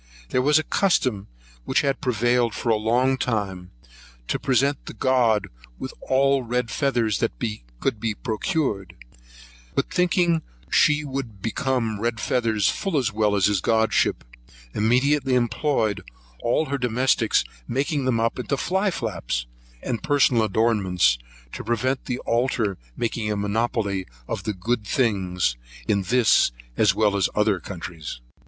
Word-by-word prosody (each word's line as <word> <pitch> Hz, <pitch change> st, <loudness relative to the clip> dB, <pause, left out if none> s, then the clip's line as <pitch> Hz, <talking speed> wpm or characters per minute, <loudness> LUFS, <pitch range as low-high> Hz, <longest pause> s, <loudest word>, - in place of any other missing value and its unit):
There 125 Hz, -, +1 dB
was 150 Hz, +3 st, +4 dB
a 155 Hz, -, +2 dB
custom 130 Hz, -, +1 dB, 0.4 s
which -, -, +1 dB
had 140 Hz, -1 st, -1 dB
prevailed 120 Hz, -2 st, +1 dB
for 120 Hz, -, -2 dB
a 115 Hz, -, +5 dB
long 125 Hz, +5 st, +1 dB
time, 95 Hz, -6 st, -2 dB, 0.6 s
to -, -, 0 dB
present 140 Hz, +1 st, +1 dB
the -, -, -7 dB
god 120 Hz, -6 st, +2 dB, 0.3 s
with 130 Hz, -, -6 dB
all 135 Hz, +1 st, +2 dB
red 120 Hz, -1 st, -2 dB
feathers 120 Hz, -, +1 dB
that -, -, 0 dB, 0.5 s
could 105 Hz, -, -1 dB
be 110 Hz, -1 st, -2 dB
procured; 110 Hz, -, -2 dB, 0.8 s
but -, -, -1 dB
thinking 175 Hz, -2 st, +2 dB, 0.3 s
she 150 Hz, 0 st, +4 dB
would 130 Hz, -7 st, -5 dB
become 115 Hz, -3 st, -1 dB
red 115 Hz, 0 st, -1 dB
feathers 110 Hz, -4 st, +1 dB
full 195 Hz, -6 st, 0 dB
as 125 Hz, -4 st, 0 dB
well 105 Hz, -1 st, +2 dB
as 100 Hz, -, +3 dB
his 100 Hz, -3 st, +2 dB
godship, 110 Hz, +2 st, +2 dB, 0.5 s
immediately 130 Hz, +4 st, +2 dB
employed 120 Hz, -2 st, 0 dB, 0.4 s
all 120 Hz, +7 st, +1 dB
her 140 Hz, -1 st, -2 dB
domestics 125 Hz, +1 st, +2 dB, 0.2 s
making 140 Hz, +2 st, -1 dB
them 125 Hz, -3 st, +1 dB
up 115 Hz, +2 st, 0 dB
into 135 Hz, +2 st, -1 dB
fly 190 Hz, +7 st, +1 dB
flaps, 90 Hz, -, -3 dB, 0.4 s
and 120 Hz, -, -1 dB
other -, -, -10 dB
personal 125 Hz, -6 st, +3 dB
ornaments, 95 Hz, -, +3 dB, 0.3 s
to -, -, -6 dB
prevent 130 Hz, +4 st, -1 dB
the 125 Hz, -, -2 dB
altar 115 Hz, -4 st, 0 dB, 0.2 s
making 115 Hz, -2 st, -1 dB
a 105 Hz, -, -1 dB
monopoly 100 Hz, -2 st, -1 dB, 0.2 s
of -, -, -2 dB
all -, -, -12 dB
the 105 Hz, -, -1 dB
good 110 Hz, +5 st, -1 dB
things, 95 Hz, -, 0 dB, 0.3 s
in 100 Hz, -2 st, +2 dB
this, 115 Hz, -, +4 dB, 0.2 s
as -, -, +3 dB
well 105 Hz, -2 st, +2 dB
as 100 Hz, -2 st, +2 dB
in -, -, -5 dB
other 105 Hz, -3 st, +2 dB
countries. 85 Hz, -7 st, -7 dB
115 Hz, 150 wpm, -24 LUFS, 105-130 Hz, 0.8 s, a